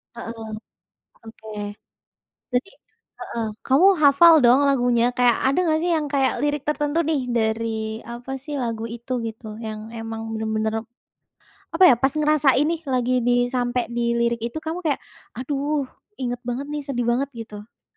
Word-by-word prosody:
Heeh. 225 -1 -7 0.8
Oke. 220 -1 -11 1.0
Berarti 250 +10 -1 0.5
heeh. 230 -1 -4 0.2
Kamu 290 +9 +5
hafal 295 +4 +7
dong 245 +2 +6
lagunya, 245 -3 +2
kayak 245 -2 +4
ada 275 +6 +2
nggak 315 -1 +2
sih 350 - +1
yang 300 -2 -1
kayak 270 -2 +1
lirik 295 -1 0
tertentu 300 +1 0
nih, 310 -3 0
dari 225 -1 0 0.3
apa 240 +3 -8
sih, 290 +2 -6
lagu 230 -2 -3
itu 235 +2 -6
gitu, 220 -1 -8
yang 220 0 -7
emang 225 0 -5
benar-benar 220 0 -1 0.9
apa 350 +3 +5
ya, - - +7
pas 270 +3 +1
ngerasain 300 -2 +3
nih, 335 -1 -1
lagi 255 -2 0
di 245 0 +3
sampai 245 -2 -1
di 235 0 -1
lirik 235 0 +1
itu 240 +6 -3
kamu 320 +2 -4
kayak 290 -4 0 0.4
"Aduh 280 +2 -1 0.3
inget 245 -1 -3
banget 245 +4 -3
nih, 295 0 -4
sedih 245 -4 -2
banget," 255 +3 +1
gitu? 225 -3 -8
Hayo. 220 - -36
245 Hz, 155 wpm, -23 LUFS, 230-285 Hz, 1.0 s, hafal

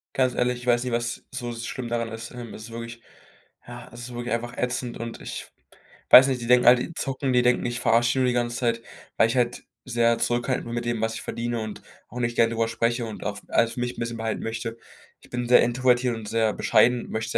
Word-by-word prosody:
Ganz 130 -1 +2
ehrlich, 125 0 +1
ich 125 - -11
weiß 120 -1 +3
nicht, 125 -1 -3
was 120 0 -2
so 120 -1 -5
schlimm 120 +1 -5
daran 115 -1 -2
ist. 115 +1 -7
Hm, 120 -3 -8
es 110 - -9
ist 115 - -10
wirklich 115 0 -7 0.7
ja, 120 0 -10
es 120 - -10
ist 120 0 -8
wirklich 120 +1 -4
einfach 120 +1 -4
ätzend 125 -1 -2
und 115 0 -6
ich - - -7 0.6
weiß 130 +2 +10
nicht, 130 -2 0
die 115 - -5
denken 125 0 +5
halt, 125 0 +8
die 170 - -5
zocken. 135 -4 -2
Die 125 - +5
denken, 125 0 +2
ich 120 0 -2
verarsche 115 +1 +3
die 130 - -1
nur 130 - +3
die 125 - +1
ganze 120 -1 -1
Zeit, 115 -1 0 0.4
weil 115 - +5
ich 115 - -2
halt 120 0 0 0.2
sehr 115 -2 +2
zurückhaltend 120 +2 0
bin 120 - -5
mit 120 0 -3
dem, 120 -2 -1
was 110 0 -1
ich 110 - -6
verdiene, 120 0 -3
und 110 -1 -6 0.3
auch 125 - -7
nicht 120 -1 -1
gern 115 0 +5
darüber 115 0 0
spreche 115 +1 0
und 110 -2 -7
auch 105 -1 -3
alles 115 0 +2
für 120 - -4
mich 120 0 -3
'n - - -7
bisschen 115 0 -3
behalten 110 -1 -3
möchte. 115 0 -4 0.4
Ich - - -19
bin 120 0 -3
sehr 125 - +7
introvertiert 125 0 +2
und 110 -2 -8
sehr 110 -2 +1
bescheiden 125 0 +3
und - - -11
möchte, 110 0 -1
120 Hz, 250 wpm, -25 LUFS, 115-125 Hz, 0.7 s, weiß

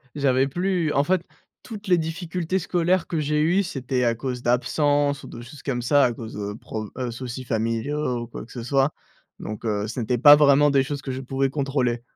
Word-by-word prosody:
j'avais 135 -2 +2
plus 175 +1 0
en 140 - +3
fait 185 +3 +1 0.4
toutes 215 -3 -9
les 180 -1 +4
difficultés 170 +2 -2
scolaires 180 0 +1
que 165 - -2
j'ai 150 0 0
eues, 175 +6 +3
c'était 130 -7 -2
à 115 -1 +2
cause 125 +1 -4
d'absences 145 +3 +1
ou - - -9
de 120 - -9
choses 130 +5 -12
comme 125 -3 -2
ça, 145 +3 +4
à 120 - 0
cause 115 -1 -8
de 105 0 -4
pro 110 0 -6
heu, 125 -2 -3
soucis 125 +1 -6
familiaux 120 +3 -1
ou - - -8
quoi 115 - -8
que - - -18
ce 120 -2 -6
soit, 135 +3 +2 0.5
donc 105 +2 -7
heu, 105 -1 -1
ce 115 +3 -5
n'était 120 +2 0
pas 145 +5 +9
vraiment 145 0 +5
des 135 -1 +3
choses 140 +1 -4
que 135 - -5
je 130 - -4
pouvais 135 +1 -1
contrôler, 135 -4 -1
135 Hz, 215 wpm, -24 LUFS, 120-150 Hz, 0.5 s, pas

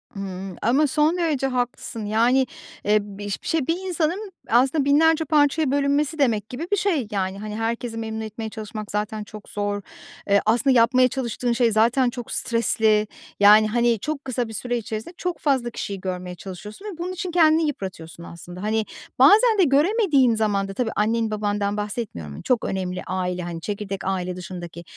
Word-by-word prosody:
Imm, 190 -1 -6
ama 275 +7 +3
son 305 +5 +2
derece 305 -6 0
haklısın. 245 -3 -3
Yani, 235 +5 +3 0.4
eee, 210 +1 +4
biş 205 0 -6
bir - - -7
şey, 320 -5 0
bir 330 - +2
insanın 360 +4 -1 0.2
aslında 265 +5 +3
binlerce 320 +3 +4
parçaya 295 -1 +2
bölünmesi 285 +2 +1
demek 220 -6 +1
gibi 275 +8 -5
bir 410 - +3
şey, 350 - 0
yani. 195 -1 -2
Hani, 210 0 -6
herkesi 225 +1 -3
memnun 220 -1 -4
etmeye 220 0 -5
çalışmak 215 0 -7
zaten 210 +1 -2
çok 210 0 -12
zor. 205 0 -2 0.5
Eee, 200 0 +5
aslında 245 +5 +3
yapmaya 250 +2 +5
çalıştığın 245 -1 -2
şey 235 -1 +2
zaten 235 +4 +3
çok 240 -1 -7
stresli, 220 -2 +1 0.3
yani, 210 +1 +7
hani, 235 0 +2
çok 300 +4 -4
kısa 250 -2 -2
bir 220 - -9
süre 245 +3 -2
içerisinde 220 +7 -5
çok 360 -1 -3
fazla 265 -5 +1
kişiyi 200 -4 -5
görmeye 180 -1 -4
çalışıyorsun 200 - -9
ve 405 -6 -6
bunun 350 +2 -4
için 370 0 -4
kendini 320 -2 +4
yıpratıyorsun 180 - -6
aslında. 175 +2 -10
Hani, 215 +1 0 0.3
bazen 440 +2 +6
de - - +7
göremediğin 295 - +3
zaman 205 -3 0
da, 195 - -6
tabii 225 +1 -1
annen, 225 +1 +1
babandan 205 -1 -1
bahsetmiyorum, 205 - -5
çok 250 -3 +1
önemli 185 -1 -3
aile, 180 -1 -2
hani, 170 -1 -6
çekirdek 200 0 -4
aile 185 -1 -2
dışındaki. 175 -2 -8
225 Hz, 175 wpm, -23 LUFS, 205-280 Hz, 0.5 s, yani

